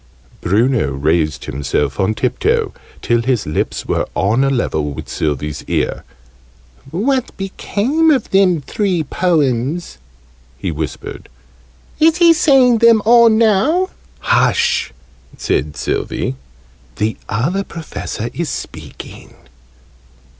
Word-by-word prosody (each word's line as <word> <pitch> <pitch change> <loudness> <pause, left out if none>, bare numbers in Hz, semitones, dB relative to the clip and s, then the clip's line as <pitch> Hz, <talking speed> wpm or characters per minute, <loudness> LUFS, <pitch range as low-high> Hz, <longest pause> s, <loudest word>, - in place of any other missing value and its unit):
Bruno 110 - +1
raised 75 +3 0
himself 70 0 -2
on 105 +3 +1
tiptoe, - - 0 0.3
till 120 0 +2
his 120 -3 0
lips 75 - -2
were - - -1
on 110 +7 +2
a 135 - +2
level 80 - -1
with - - -8
Sylvie's 75 0 -3
ear. - - -1 0.9
"What 245 - -1
became 225 +10 0
of 280 -4 +1
them 185 -5 +3
three 185 +2 -1
Poems?" 150 - -1 0.6
he 95 - -3
whispered. 75 -2 -6 0.7
"Is 320 +1 +4
he 340 -2 +6
saying 265 -8 +4
them 230 -2 +5
all, 235 0 +7
now?" 225 - +2 0.3
"Hush!" - - +2 0.5
said 75 0 -1
Sylvie. 75 - -2 0.6
"The 110 +1 -1
Other 170 +13 0
Professor 155 - -6
is 170 -2 -3
speaking!" - - -9
150 Hz, 110 wpm, -17 LUFS, -, 0.9 s, all